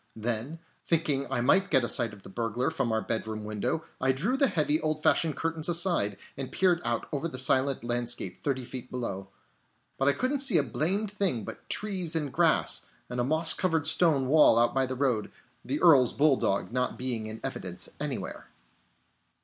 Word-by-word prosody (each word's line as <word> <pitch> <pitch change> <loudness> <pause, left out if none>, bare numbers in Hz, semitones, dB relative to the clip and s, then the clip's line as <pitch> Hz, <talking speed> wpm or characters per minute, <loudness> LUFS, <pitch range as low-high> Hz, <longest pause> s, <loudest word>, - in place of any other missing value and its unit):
Then, 115 +7 -3 0.3
thinking 150 -5 0
I 120 - 0
might 195 +10 +3
get 130 - +3
a - - 0
sight 120 -2 +1
of 100 -2 -14
the - - -11
burglar 115 +4 -2
from 115 - -1
our 110 0 -1
bedroom 110 -1 -3
window, 105 +9 -3 0.2
I 130 +1 +3
drew 180 - -1
the 275 0 +3
heavy, 155 - +1
old 155 0 -2
fashioned 155 0 +2
curtains 165 0 -2
aside, 170 - +1 0.2
and 135 -1 -6
peered 180 -2 +2
out 120 0 -2
over 150 +3 -2
the 130 - -6
silent 130 0 +3
landscape 120 -6 -1
thirty 130 -3 -2
feet 125 0 -7
below. 100 -6 -5 0.7
But 135 - +1
I 140 - +4
couldn't 260 - -1
see 265 -10 +6
a 150 - +3
blamed 185 - -1
thing 185 - -1
but - - -10
trees 185 -6 -1
and 145 -5 -2
grass, - - +2 0.2
and 125 - -3
a - - +2
moss 155 +5 +3
covered 165 -5 0
stone 150 -7 +3
wall 150 -4 +5
out 120 0 +3
by 135 -1 +1
the 130 - -4
road; 125 -5 -1 0.3
the 140 +4 -3
Earl's 145 -8 +5
bulldog 135 -10 +1
not 125 0 -1
being 120 -4 -2
in 110 +1 -8
evidence - - -3
anywhere. - - -5
135 Hz, 190 wpm, -28 LUFS, 120-165 Hz, 0.7 s, see